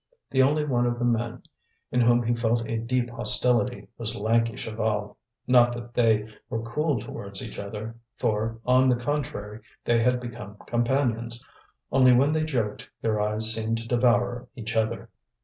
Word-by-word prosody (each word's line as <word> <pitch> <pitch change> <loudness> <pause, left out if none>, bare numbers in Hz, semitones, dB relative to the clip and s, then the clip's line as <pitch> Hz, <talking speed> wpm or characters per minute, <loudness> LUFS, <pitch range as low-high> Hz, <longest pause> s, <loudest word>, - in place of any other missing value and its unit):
The 130 - +3
only 150 +3 +2
one 120 -4 +1
of 120 0 -1
the 120 - -1
men 120 -1 -1 0.5
in 125 - +2
whom 120 0 +4
he 120 +1 +1
felt 115 0 0
a 115 0 -2
deep 120 +1 -1
hostility 120 0 +4
was 110 -2 -3
lanky 115 +2 +1
Chaval: 110 -2 -3 0.3
not 120 -1 +5
that 120 0 -8
they 110 -3 +2 0.2
were 115 0 -3
cool 140 +3 -1
towards 100 -2 -4
each - - -9
other, 105 +2 -6 0.2
for, 110 +1 -1
on 130 +1 +4
the 125 - +4
contrary, 120 -5 -4 0.3
they 115 -1 +3
had 125 +1 +2
become 115 -4 -8
companions; 120 -1 -1 0.5
only 130 -2 +6
when 135 +4 +4
they 155 0 +1
joked 120 -12 -3
their 110 -2 +1
eyes 110 +1 0
seemed 110 0 -1
to 115 0 -7
devour 120 0 +1
each 115 -2 -5
other. 110 +1 -1
120 Hz, 165 wpm, -26 LUFS, 110-125 Hz, 0.5 s, only